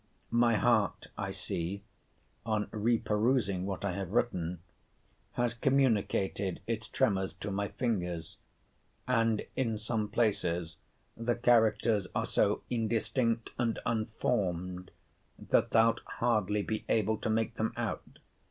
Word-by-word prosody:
My 120 -1 +4
heart, 110 0 +2
I - - -3
see, 90 +4 -4 0.6
(on 110 -2 -1
re 115 +2 +2
perusing 105 -4 +1
what 100 0 -3
I 100 - 0
have 95 -1 -4
written,) 90 -8 0 0.7
has 120 -1 0
communicated 110 -7 +1
its 110 -1 -3
tremors 95 -2 +1
to 100 +2 -5
my 100 +1 -1
fingers; 90 -10 -2 0.7
and 115 -3 +2
in 115 -4 0
some 110 0 -1
places 85 -8 0 0.4
the 115 +1 0
characters 115 -4 +3
are - - +1
so - - +1
indistinct 115 0 0
and 115 -2 +1
unformed, 90 -5 -1 0.5
that - - +2
thou'lt 115 0 +4 0.2
hardly 105 -3 +1
be 110 +1 -3
able 110 0 +2
to - - -2
make 110 0 +1
them 110 - 0
out. - - -4
110 Hz, 125 wpm, -31 LUFS, 95-115 Hz, 0.7 s, My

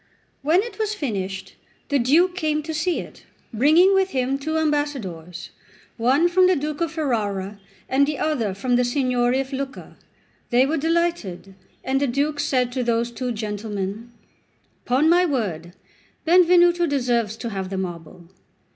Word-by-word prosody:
When 330 +7 +3
it 470 -1 -9
was 430 -1 -1
finished, 195 - -4 0.4
the 285 -1 +2
Duke 320 +9 +3
came 305 -3 -1
to 320 +1 -5
see 325 +3 0
it, - - -13 0.3
bringing 315 - +5
with 385 0 +2
him 265 -2 -1
two 315 +3 -2
ambassadors, 245 - -3 0.4
one 265 +8 +3
from 365 +1 +4
the 370 - +3
Duke 300 +1 -4
of 335 -2 0
Ferrara, 210 - -2 0.3
the 280 +2 +1
other 235 -11 -1
from 245 +5 0
the 250 - +3
Signory 250 0 +1
of 270 +1 -4
Lucca. 270 0 -6 0.5
They 250 +1 +4
were 310 +4 -1
delighted, 325 - -1 0.3
and 270 +1 0
the 285 - +2
Duke 285 +4 -1
said 255 -4 0
to 255 0 -2
those 235 0 0
two 250 +1 -3
gentlemen: 210 0 -5 0.8
"Upon 260 +5 +3
my 350 +2 +5
word, 190 - -2 0.5
Benvenuto 350 0 +5
deserves 240 -6 0
to 235 0 -5
have 190 -2 -4
the 195 - -4
marble." 175 -1 -6
265 Hz, 155 wpm, -22 LUFS, 220-315 Hz, 0.8 s, bringing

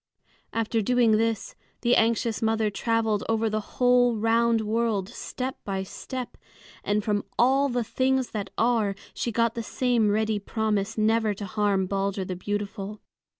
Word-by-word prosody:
After 225 0 0
doing 235 0 +3
this, 225 -1 -1 0.3
the 240 0 +3
anxious 230 0 +1
mother 220 -1 +1
traveled 220 0 0
over 225 -1 +1
the 215 - 0 0.2
whole 245 -1 +4
round 230 +1 +2
world, 215 -3 0
step 255 +2 -5
by 195 -1 -2
step; 250 +6 -7 0.5
and 205 0 0
from 205 -1 0
all 270 +3 +4
the 245 -1 0
things 260 +2 0
that 200 -3 -4
are 225 -4 +2 0.2
she 235 - -2
got 230 +1 +1
the 230 - -3
same 235 -1 +1
ready 215 0 +1
promise 215 0 -1
never 220 -1 +2
to 205 - -6
harm 200 -1 +1
Balder 195 0 -1
the 185 - -4
beautiful. 205 +2 -4
220 Hz, 150 wpm, -26 LUFS, 205-235 Hz, 0.5 s, whole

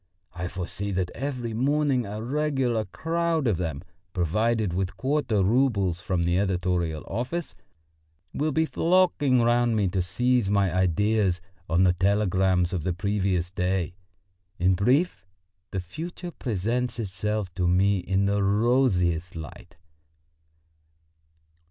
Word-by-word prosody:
I 90 +1 -4
foresee 90 +3 -4
that 90 -1 -1
every 125 -3 -4
morning 135 0 +1
a 105 +2 -5
regular 135 -4 0
crowd 165 +1 -1
of 110 -7 +2
them, 80 -3 -3 0.3
provided 105 +3 +1
with 95 +1 -2
quarter 130 -7 +1
roubles 100 -6 +2
from 90 -2 -1
the 85 +2 +2
editorial 90 -5 -1
office, 125 - -3 0.8
will 155 +2 0
be 160 +3 +2
flocking 160 -8 +2
round 120 0 +3
me 105 -3 +2
to 95 +1 0
seize 120 +4 +1
my 100 -3 +2
ideas 95 +1 +2 0.3
on 85 +3 +3
the 90 -1 +4
telegrams 95 -1 +2
of 90 - -1
the 90 +3 -1
previous 95 -2 -1
day. 90 -2 -1 0.6
In 90 +2 +3
brief, 120 - +1 0.4
the 95 - -3
future 170 - -7
presents 120 - -2
itself 105 -2 -3
to 90 -1 0
me 95 +2 +3
in 95 +2 0
the 100 0 +1
rosiest 100 -6 +2
light." 75 -2 -9
100 Hz, 125 wpm, -26 LUFS, 90-125 Hz, 0.8 s, the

